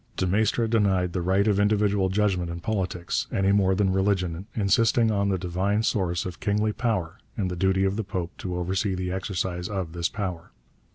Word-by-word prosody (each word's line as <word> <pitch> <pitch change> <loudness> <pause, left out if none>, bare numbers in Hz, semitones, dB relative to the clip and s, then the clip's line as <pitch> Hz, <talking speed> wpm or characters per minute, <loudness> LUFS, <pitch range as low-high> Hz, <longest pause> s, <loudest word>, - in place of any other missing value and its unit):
De 95 - +1
Maistre 110 +5 +1
denied 95 -6 +1
the 90 - -1
right 95 +4 +2
of 100 -2 +2
individual 100 -2 +2
judgment 95 -3 0
in 85 0 -5
politics 90 -3 -2
any 95 0 +2
more 95 -2 +3
than 100 0 +2
in - - 0
religion, 95 -2 0
insisting 115 +2 +3
on 100 -1 +1
the 95 - +1
divine 95 +4 0
source 90 -5 0
of 90 - -6
kingly 105 +1 0
power 105 -10 -2 0.2
and 95 -3 -1
the - - -3
duty 95 +2 +2
of 95 +1 0
the 110 - -1
Pope 90 -3 -4
to 90 -1 -4
oversee 95 +2 -1
the 90 0 -3
exercise 95 -2 -3
of 95 -5 -3
this 85 +1 -1
power. 90 -6 -5
95 Hz, 195 wpm, -26 LUFS, 90-105 Hz, 0.2 s, more